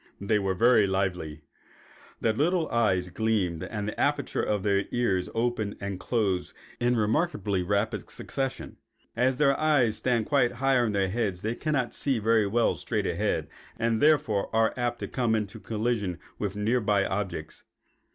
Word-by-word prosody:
They 105 +1 +1
were 95 -1 -1
very 115 0 +5
lively. 90 -5 -2 0.8
Their 110 - +2
little 160 +7 +1
eyes 95 -6 +1
gleamed 95 -4 0
and 105 -2 -4
the 105 - -5
apertures 145 -2 0
of 105 -2 0
the 100 -1 +1
ears 100 -7 0
opened 115 -3 -1
and 100 -2 -4
closed 100 -4 -1 0.2
in 120 +1 +2
remarkably 105 - 0
rapid 100 +4 -1
succession. 135 -1 -4 0.4
As 125 +2 +2
their 140 -1 +4
eyes 140 -8 +3
stand 115 0 +1
quite 130 -5 +2
high 130 +1 +2
on 115 -3 +1
their 95 -1 +1
heads 100 -4 -2
they 110 +2 0
cannot 140 -2 -1
see 135 -3 0
very 110 -1 +2
well 115 +3 +2
straight - - -2
ahead, - - -1 0.3
and 115 -1 0
therefore 145 -10 +3
are 110 0 +3
apt 120 -1 -1
to - - -3
come 120 -4 0
into 105 -3 -3
collision 110 -5 -2 0.2
with 100 -2 -2
near 110 +4 +1
by 100 -2 +2
objects. 95 -5 -4
110 Hz, 160 wpm, -27 LUFS, 100-120 Hz, 0.8 s, very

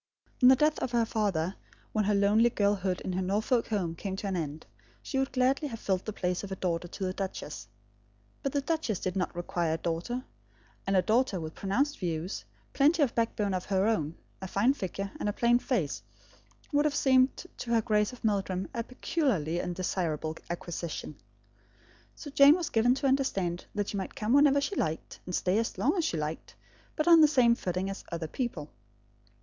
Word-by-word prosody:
On 250 - +8
the 265 - +8
death 300 +3 +2
of 250 - -3
her 235 -1 +3
father, 195 -5 -1 0.4
when 215 -1 +1
her 205 0 +2
lonely 210 +4 +4
girlhood 200 -4 0
in 185 - -3
her 185 - -1
Norfolk 215 +6 +1
home 190 -7 -1
came 190 +3 -5
to 195 - -6
an 195 -1 -1
end, 155 -2 -4 0.4
she 270 - -2
would 270 0 0
gladly 265 +3 +1
have 230 -5 -7
filled 190 -2 -1
the 215 - -3
place 180 -2 -2
of 200 - -7
a - - -2
daughter 175 -2 -2
to 195 - -7
the 185 0 -1
duchess. 190 - -5 0.7
But 275 - -1
the 285 - +1
duchess 305 - -1
did 185 0 -3
not 180 -2 -2
require 175 -2 -1
a - - -3
daughter; 175 +11 -3 0.6
and 195 - +2
a 185 - +4
daughter 225 -3 +2
with 160 -1 -6
pronounced 275 +10 -1
views, 165 - -3 0.3
plenty 300 +3 +4
of 255 - 0
back 230 -1 0
bone 205 -3 0
of 185 -1 -2
her 195 -1 +1
own, 165 -8 0 0.3
a 190 - -4
fine 210 +8 +2
figure, 195 -4 -4
and 210 - -1
a - - -2
plain 240 +2 +3
face, 230 - -1 0.7
would 290 +1 +3
have 300 - +1
seemed 260 -1 +4 0.2
to 240 - -6
her 230 -1 +4
Grace 210 0 +2
of 250 - -13
Meldrum 195 -3 0
a 230 - -2
peculiarly 230 - -1
undesirable 175 -3 -2
acquisition. 170 -3 -5 1.0
So 290 - -9
Jane 280 +2 +7
was 345 -3 -3
given 240 +3 +3
to 275 - 0
understand 195 -11 0
that 205 -1 -1
she 205 - -3
might 190 - -5
come 215 +3 0
whenever 285 0 +5
she 290 - -2
liked, 160 - -3
and 180 - -2
stay 190 +4 +1
as 230 - -2
long 295 +8 +2
as 350 - +1
she 165 - -1
liked, 155 +1 -5 0.4
but 305 - -1
on 335 -2 +8
the 305 - +8
same 250 -5 +4
footing 185 -4 -2
as 195 0 -5
other 165 -1 -3
people. 165 - -4
205 Hz, 200 wpm, -29 LUFS, 180-255 Hz, 1.0 s, On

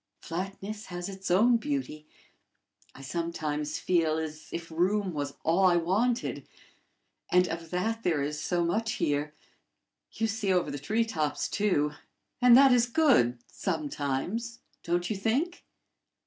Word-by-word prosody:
"Flatness 195 +5 -5
has 175 0 -5
its 195 -1 -6
own 225 +7 +5
beauty. 265 - -4 0.9
I 135 - -11
sometimes 155 -1 -3
feel 165 -3 +1
as 155 -1 -5
if 170 0 -6
room 185 +3 +1
was 145 -2 -3
all 175 +4 +3
I 180 -2 +5
wanted; 210 +9 0 0.8
and 180 0 +5
of 165 0 -5
that 220 +6 -1
there 160 -8 +1
is 150 +1 -3
so 175 0 0
much 220 +6 -1
there! 145 +1 -1 0.8
You 225 - -1
see 220 -2 -1
over 180 -2 +1
the 145 - -5
tree 220 +11 0
tops, 155 -9 -1
too, 165 -8 +1 0.5
and 245 -1 +8
that 275 0 +7
is 240 -1 +4
good 240 - +3
sometimes 165 - -3 0.2
don't 175 +1 -1
you 215 - -2
think?" 255 - -1
180 Hz, 140 wpm, -29 LUFS, 155-220 Hz, 0.9 s, and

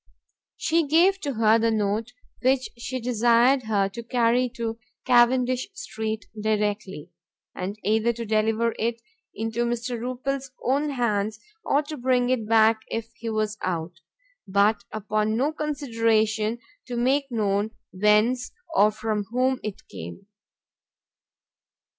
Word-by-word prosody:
She 325 -1 +1
gave 355 +6 +4
to 285 -7 -3
her 220 0 +4
the 230 0 +2
note, 215 +2 -1 0.3
which 260 0 +2
she 250 +2 -4
desired 240 +2 +3
her 205 -3 +1
to 215 +4 -7
carry 240 +1 +2
to 230 -1 -3 0.3
Cavendish 250 +4 +3
street 220 - -4 0.2
directly, 210 -5 -2 0.4
and 195 +3 -5
either 220 +2 +2
to 230 0 -5
deliver 220 +2 +1
it 230 +1 -1 0.4
into 225 +2 -1
Mr. 240 0 -2
Rupil's 260 +3 -3 0.2
own 280 +4 +1
hands, 220 -5 -1 0.2
or 290 -4 +2
to 300 +1 -7
bring 250 -1 +2
it 225 -4 -1
back 220 0 +5
if 230 0 -4
he 235 -1 -6
was 215 -1 -1
out; 170 -1 -3 0.5
but 200 +3 +2
upon 215 0 -1
no 280 +5 +1
consideration 230 -7 0 0.3
to 245 -1 -4
make 270 +3 +1
known 205 -2 0 0.2
whence 210 +6 +2 0.2
or 210 - +6
from 215 -1 -2
whom 255 +4 0
it 215 -3 -7
came. 85 - -9
230 Hz, 130 wpm, -25 LUFS, 215-250 Hz, 0.5 s, or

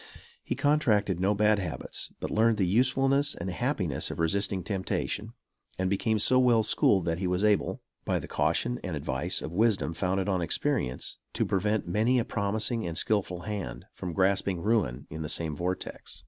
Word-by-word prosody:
He - - -2
contracted 110 - +2
no 100 +3 +2
bad 105 0 +3
habits, 90 -5 -4
but - - -4
learned 110 0 +3
the 95 - +2
usefulness 135 +7 +2
and 90 +2 -4
happiness 95 - -1
of - - -5
resisting 95 +3 0
temptation, 100 +4 -3 0.4
and 95 0 0
became 110 +2 +1
so 130 +5 +4
well 120 -3 +4
schooled 95 -3 +3
that 85 0 -1
he 95 - -1
was 90 +2 0
able, 105 -1 +1 0.2
by - - 0
the - - -6
caution 85 +11 0
and 90 -4 -3
advice 70 - -2
of - - -5
wisdom 105 -4 +2
founded 95 +2 -1
on 95 -3 +1
experience, 85 - -1
to - - 0
prevent 105 +1 0
many 110 +8 +2
a 120 - +1
promising 110 +3 -1
and 80 -1 -2
skillful 95 -4 0
hand 105 -3 -5
from 90 -2 -5
grasping 95 -1 +1
ruin 105 - 0
in 80 +1 -5
the 75 - -4
same 80 -3 -1
vortex. 90 +4 -4
100 Hz, 175 wpm, -28 LUFS, 90-110 Hz, 0.4 s, so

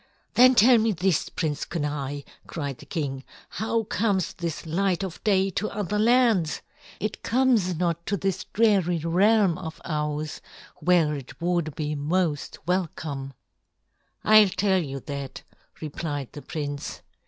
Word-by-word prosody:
"Then 255 +1 +7
tell 235 +2 +7
me 220 0 +2
this, 180 -2 +1
Prince 150 -4 -2
Kenai," 145 -3 -3 0.3
cried 140 -5 -5
the - - -13
king. 135 -5 -3 0.3
"How 225 +3 -1
comes 200 -3 0
this 170 -3 -4
light 185 +3 0
of 185 -4 -6
day 195 -2 +2
to 215 +4 -2
other 210 0 -2
lands? 225 -8 +3 0.4
It 215 - -3
comes 235 -7 +2
not 170 0 -1
to 200 - 0
this 195 0 -2
dreary 195 -6 +2
realm 185 +3 +3
of 160 0 -7
ours, 150 -1 -3 0.4
where 170 -4 +3
it 140 -3 -8
would 170 -3 -1
be 150 -1 -2
most 150 +1 -1
welcome." 155 -6 -2 0.9
"I'll 215 -2 +7
tell 190 0 +2
you 135 -4 -5
that," 140 -2 -6 0.4
replied 145 -3 -4
the 145 - -9
prince. 145 -2 -5
175 Hz, 140 wpm, -26 LUFS, 150-200 Hz, 0.9 s, Then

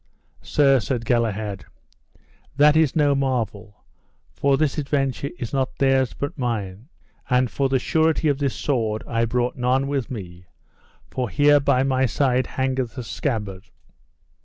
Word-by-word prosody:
Sir, 135 -2 +3
said 115 +1 -3
Galahad, 110 -4 -1 0.9
that 150 +1 +6
is 160 -3 +3
no 145 -2 +3
marvel, 115 -6 -3 0.5
for 140 -1 +2
this 155 0 0
adventure 140 -1 -1
is 120 -5 -6
not 135 -2 -1
theirs 135 -2 +2
but 140 +1 -4
mine; 110 - -3 0.4
and 125 -1 +2
for 135 -1 0
the 135 - +2
surety 160 +4 +1
of 145 -2 +1
this 140 -2 -1
sword 110 -6 -1
I 115 0 0
brought 120 +2 -1
none 130 +2 +1
with 140 -4 -2
me, 90 -7 -8 0.6
for 125 -3 -2
here 145 +9 +4
by 130 -2 +2
my 130 -1 +1
side 130 0 +1
hangeth 130 -2 -2
the 125 - -5
scabbard. 105 -6 -4
130 Hz, 145 wpm, -23 LUFS, 115-140 Hz, 0.9 s, that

